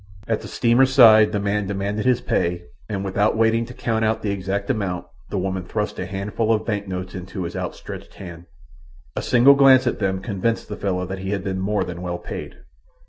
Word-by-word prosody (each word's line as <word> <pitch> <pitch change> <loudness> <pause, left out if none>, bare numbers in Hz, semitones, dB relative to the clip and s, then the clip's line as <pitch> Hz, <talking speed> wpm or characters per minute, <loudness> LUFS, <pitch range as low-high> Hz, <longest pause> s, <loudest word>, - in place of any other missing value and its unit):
At 110 -1 0
the - - -8
steamer's 125 +2 +3
side 110 -5 +7
the 105 - -1
man 100 0 -1
demanded 100 +2 -2
his 125 -2 +3
pay 85 0 -1 0.3
and, 100 -2 -3
without 100 +3 +1
waiting 115 +1 +2
to 125 - -10
count 110 -1 -1
out 110 0 0
the 105 - 0
exact 100 +1 -3
amount, 95 -7 -3 0.2
the 100 - -3
woman 95 0 -2
thrust 105 +3 -3
a 90 - -3
handful 105 +4 -2
of 110 - +1
bank 105 -3 -2
notes 90 -1 -5
into 95 0 -6
his 85 - -5
outstretched - - -7
hand. 85 -2 -10 0.7
A - - -2
single 125 +3 +6
glance 135 -2 +6
at 120 - -1
them 95 -2 0
convinced 110 +2 -2
the 105 - -4
fellow 90 -3 -2
that 95 +1 -6
he 95 0 -5
had 100 -2 -3
been 95 -2 -3
more 100 +2 0
than 85 0 -7
well 90 -1 -3
paid. - - -7
100 Hz, 210 wpm, -22 LUFS, 95-110 Hz, 0.7 s, side